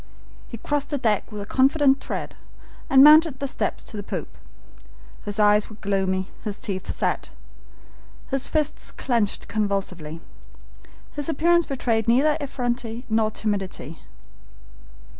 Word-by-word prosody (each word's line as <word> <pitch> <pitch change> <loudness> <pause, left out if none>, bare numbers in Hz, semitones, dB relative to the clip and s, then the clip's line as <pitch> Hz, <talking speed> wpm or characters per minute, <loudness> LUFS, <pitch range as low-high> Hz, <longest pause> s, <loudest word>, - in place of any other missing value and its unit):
He 235 - -8
crossed 290 +5 -2
the 290 - -1
deck 225 -4 0
with 210 -1 -5
a - - -8
confident 275 +3 +3
tread, - - -5 0.5
and 270 0 +7
mounted 305 -1 +7
the 280 - -2
steps - - -3
to - - -7
the - - -3
poop. - - -6 0.9
His 205 0 -4
eyes 210 0 +4
were 215 - -11
gloomy, 190 -2 -1
his 210 -2 -4
teeth 190 -3 -5
set, - - -2 1.0
his 270 0 +1
fists 305 -1 -1
clenched 230 -6 -1
convulsively. 195 -7 -2 0.9
His 290 +1 -3
appearance 340 +2 +3
betrayed 235 -5 -1
neither 275 +6 +4
effrontery 245 -3 -3
nor 220 0 +2
timidity. 195 -7 -4
230 Hz, 130 wpm, -24 LUFS, 205-275 Hz, 1.0 s, and